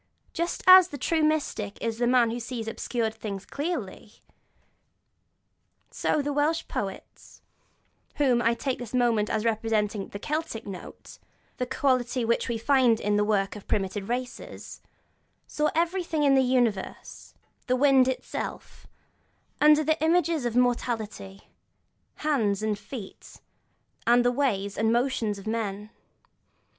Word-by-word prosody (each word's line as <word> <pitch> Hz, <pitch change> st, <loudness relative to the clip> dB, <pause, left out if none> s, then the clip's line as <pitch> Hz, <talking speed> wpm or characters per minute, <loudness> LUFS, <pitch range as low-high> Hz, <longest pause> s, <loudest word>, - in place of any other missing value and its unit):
Just 340 Hz, 0 st, -3 dB
as 370 Hz, -1 st, +9 dB
the 290 Hz, -, -8 dB
true 320 Hz, +4 st, 0 dB
mystic 295 Hz, -10 st, -1 dB
is 230 Hz, 0 st, -3 dB
the 240 Hz, -, +2 dB
man 240 Hz, -2 st, +4 dB
who 240 Hz, -, -4 dB
sees 230 Hz, -1 st, -5 dB
obscure 225 Hz, 0 st, -2 dB
things 200 Hz, -3 st, -7 dB
clearly, 280 Hz, -, -5 dB, 1.8 s
so 295 Hz, -, 0 dB
the 290 Hz, +1 st, -2 dB
Welsh 300 Hz, +3 st, 0 dB
poets 195 Hz, -2 st, -7 dB, 0.7 s
(whom 255 Hz, -5 st, +2 dB
I 235 Hz, 0 st, +2 dB
take 265 Hz, +1 st, -3 dB
for 245 Hz, -, -5 dB
the 240 Hz, +3 st, -3 dB
moment 230 Hz, -4 st, +2 dB
as 220 Hz, 0 st, -1 dB
representing 215 Hz, -2 st, 0 dB
the -, -, -8 dB
'Celtic 300 Hz, -2 st, -4 dB
note,' 190 Hz, -3 st, -10 dB, 0.4 s
the 250 Hz, -, -2 dB
quality 255 Hz, -2 st, 0 dB
which 235 Hz, +1 st, 0 dB
we 235 Hz, -, -1 dB
find 240 Hz, -1 st, +3 dB
in 205 Hz, 0 st, 0 dB
the 210 Hz, -, +3 dB
work 200 Hz, -2 st, 0 dB
of 205 Hz, -, -11 dB
primitive 195 Hz, 0 st, -2 dB
races) 245 Hz, +1 st, -6 dB, 0.6 s
saw 300 Hz, 0 st, 0 dB
everything 335 Hz, -2 st, 0 dB
in 280 Hz, -1 st, +5 dB
the 265 Hz, -, +5 dB
universe, 245 Hz, -6 st, -1 dB, 0.3 s
the 255 Hz, -, +2 dB
wind 265 Hz, -1 st, +5 dB
itself, 260 Hz, -, -5 dB, 0.7 s
under 300 Hz, +1 st, +6 dB
the 310 Hz, +1 st, 0 dB
images 330 Hz, -3 st, +2 dB
of 240 Hz, -1 st, -2 dB
mortality, 225 Hz, -5 st, -1 dB, 0.7 s
hands 220 Hz, -10 st, 0 dB
and 210 Hz, -2 st, -1 dB
feet 220 Hz, -7 st, -10 dB, 0.7 s
and 240 Hz, +1 st, +5 dB
the 245 Hz, -, +4 dB
ways 205 Hz, -8 st, -1 dB
and 220 Hz, +1 st, +2 dB
motions 235 Hz, -4 st, 0 dB
of 195 Hz, -, -11 dB
men. 215 Hz, -2 st, -3 dB
240 Hz, 140 wpm, -26 LUFS, 215-280 Hz, 1.8 s, as